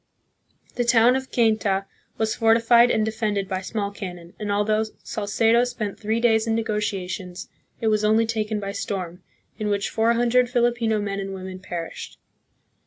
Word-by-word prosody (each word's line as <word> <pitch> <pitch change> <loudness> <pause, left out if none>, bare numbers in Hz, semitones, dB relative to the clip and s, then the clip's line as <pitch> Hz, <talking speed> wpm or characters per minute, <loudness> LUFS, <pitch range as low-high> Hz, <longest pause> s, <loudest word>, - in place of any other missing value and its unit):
The 245 - +2
town 240 +1 +5
of 265 0 -4
Cainta 210 -4 +2 0.3
was 220 -1 0
fortified 230 +1 +5
and 215 -2 +2
defended 210 -3 -1
by 190 -1 -3
small 200 +1 -3
cannon, 180 -4 -8
and 210 -1 -3
although 215 +2 +2 0.2
Salcedo 225 +3 +2
spent 235 -5 -4
three 220 +2 -1
days 225 -2 +3
hi - - +1
negotiations, 205 -4 -3 0.3
it 225 - 0
was 215 0 +1
only 220 +2 +4
taken 220 -1 -2
by 200 -1 -4
storm, 185 -3 -4 0.4
in 215 - -2
which 200 -1 -1
four 225 +1 +2
hundred 240 +1 +2
Filipino 240 -3 +1
men 200 -1 -3
and 195 0 -5
women 185 0 -7
perished. 175 -2 -7
215 Hz, 160 wpm, -24 LUFS, 200-230 Hz, 0.4 s, town